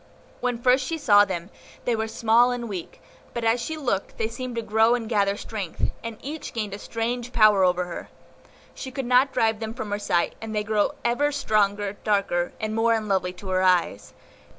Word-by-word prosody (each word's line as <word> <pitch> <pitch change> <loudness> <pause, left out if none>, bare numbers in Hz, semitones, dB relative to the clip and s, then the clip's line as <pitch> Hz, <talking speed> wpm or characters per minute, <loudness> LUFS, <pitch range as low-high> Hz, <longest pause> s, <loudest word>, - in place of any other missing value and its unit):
When 245 -1 -1
first 255 +2 +3
she 325 +5 -3
saw 205 -8 +5
them, 185 -1 -5 0.3
they 240 - +2
were 220 0 -2
small 230 +2 +3
and 245 -1 -3
weak; 190 -5 -7 0.4
but 235 - -2
as 230 +1 +2
she 315 +7 -4
looked 245 -10 -2
they 220 - 0
seemed 245 +1 -6
to 230 - -2
grow 220 +2 +3
and 230 -2 -4
gather 200 -3 +1
strength, 205 -6 -3
and 230 -1 -6
each 300 +2 -6
gained 215 -3 -3
a 200 - -6
strange 235 +3 -3
power 215 -5 +5
over 180 0 +2
her. 175 - -7 0.6
She 265 - -7
could 265 0 -4
not 255 +2 +4
drive 220 -4 +1
them 220 0 -5
from 220 -5 -5
her 205 - -1
sight, 175 -4 0
and 220 -1 -5
they 210 - 0
grew 210 -1 +1 0.2
ever 290 +5 +2
stronger, 205 -6 0
darker, 195 -4 +1
and 215 -1 -2
more 225 +1 +3
unlovely 195 -4 -1
to 190 +1 -9
her 185 0 +1
eyes. 180 - +1
220 Hz, 200 wpm, -25 LUFS, 200-240 Hz, 0.6 s, saw